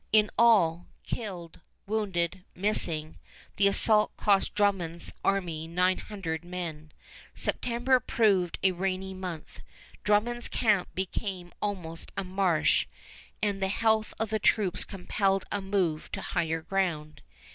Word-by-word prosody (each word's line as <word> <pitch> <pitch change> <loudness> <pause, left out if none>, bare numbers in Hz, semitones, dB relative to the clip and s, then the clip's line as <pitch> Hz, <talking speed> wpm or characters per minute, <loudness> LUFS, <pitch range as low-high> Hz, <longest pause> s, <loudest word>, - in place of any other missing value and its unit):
In 210 -1 +4
all, 185 -7 +4 0.2
killed, 180 -7 -6 0.3
wounded, 185 -4 -1
missing, 170 -5 +2 0.4
the 200 - +5
assault 210 +2 +3
cost 200 -1 +2
Drummond's 185 -5 +1
army 170 -5 -1
nine 180 +2 +1
hundred 170 -6 -5
men. 170 -4 -6 0.4
September 250 +2 +1
proved 200 -7 +2
a 190 - +5
rainy 190 +1 -2
month. 180 -4 -7 0.4
Drummond's 235 +4 +2
camp 210 -6 +2
became 185 -1 -4
almost 175 -6 -4
a 195 - -1
marsh, 185 -3 +2 0.6
and 200 -2 0
the 190 - +2
health 220 +2 +1
of 220 -1 -2
the 220 - +1
troops 195 -3 +2
compelled 195 0 -1
a 205 - -1
move 190 -5 -1
to - - -3
higher 165 -2 -1
ground. 165 -5 -2
190 Hz, 125 wpm, -28 LUFS, 170-210 Hz, 0.6 s, the